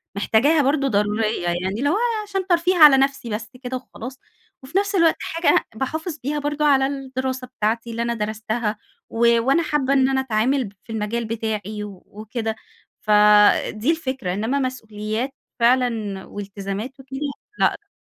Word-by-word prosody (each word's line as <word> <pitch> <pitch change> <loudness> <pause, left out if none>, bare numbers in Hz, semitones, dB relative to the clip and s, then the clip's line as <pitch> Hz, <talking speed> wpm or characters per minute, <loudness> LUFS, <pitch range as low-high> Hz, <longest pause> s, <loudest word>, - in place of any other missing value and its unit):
محتاجاها 255 +10 +3
برضه 275 0 +1
ضرورية 210 -2 0
يعني 175 +2 -1
اللي 285 +3 +1
هو 360 - +2 0.3
عشان 390 -3 -3
ترفيه 360 0 +2
على 300 -4 +9
نفسي 275 -2 0
بس 220 0 -4
كده 255 +1 -3
وخلاص، 255 0 -9 0.4
وفي 280 +8 -3
نفس 405 0 -1
الوقت 335 -3 +4
حاجة 330 +1 +2
باحافظ 315 +7 -3
بيها 295 +3 -1
برضه 295 +1 -1
على 270 -2 +4
الدراسة 260 -2 -4
بتاعتي 230 -1 -2
اللي 230 +1 -3
أنا 235 0 0
درستها، 220 0 -2 0.3
و 235 0 +3
وأنا 275 +8 +2
حابة 295 -3 +1
إن 265 -1 +4
أنا 265 0 +1
أتعامل 260 +2 +1
ب 200 - -10
في - - -11
المجال 220 +2 -2
بتاعي 215 -2 -3
وكده. 220 +3 -6 0.5
فدي 210 +4 +4
الفكرة 265 - -3
إنما 225 +8 -1
مسؤوليات 220 -2 -3 0.3
فعلًا 230 -5 +1
والتزامات 200 +5 -6
وكده، 270 0 -8 0.4
لأ. 415 - +1
245 Hz, 150 wpm, -22 LUFS, 215-275 Hz, 0.5 s, على